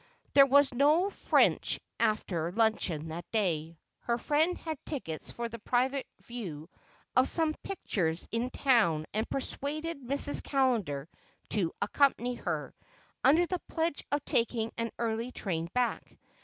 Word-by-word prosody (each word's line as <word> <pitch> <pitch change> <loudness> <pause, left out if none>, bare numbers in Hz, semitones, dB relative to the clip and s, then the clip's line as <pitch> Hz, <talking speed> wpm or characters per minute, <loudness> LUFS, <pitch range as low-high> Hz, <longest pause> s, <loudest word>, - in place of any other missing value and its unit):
There 275 -1 +8
was 280 0 +5
no 305 +9 +3
French - - +2 0.2
after 175 -6 0
luncheon 185 -7 0
that 170 +2 -7
day. 165 -7 -1 0.2
Her 235 0 -1
friend 310 +7 +1
had 315 -4 -6
tickets 165 - -5
for 235 0 -4
the 230 0 -8
private 260 +4 0 0.2
view 180 -9 -7 0.4
of 255 +2 +5
some 320 -2 +2
pictures 180 - -1
in 230 +2 -1
town 220 - +2
and 215 +2 -1
persuaded 290 +3 -2
Mrs. 280 +3 +4
Callender 225 - 0 0.4
to 185 -6 +1
accompany 255 -3 +2
her, - - -4 0.5
under 315 +7 +5
the 360 0 -3
pledge 325 -2 -1
of 290 0 -1
taking 230 -1 0
an 230 0 -2
early 230 +1 -2
train 170 -8 -3
back. 245 +1 -2
240 Hz, 135 wpm, -30 LUFS, 190-280 Hz, 0.5 s, There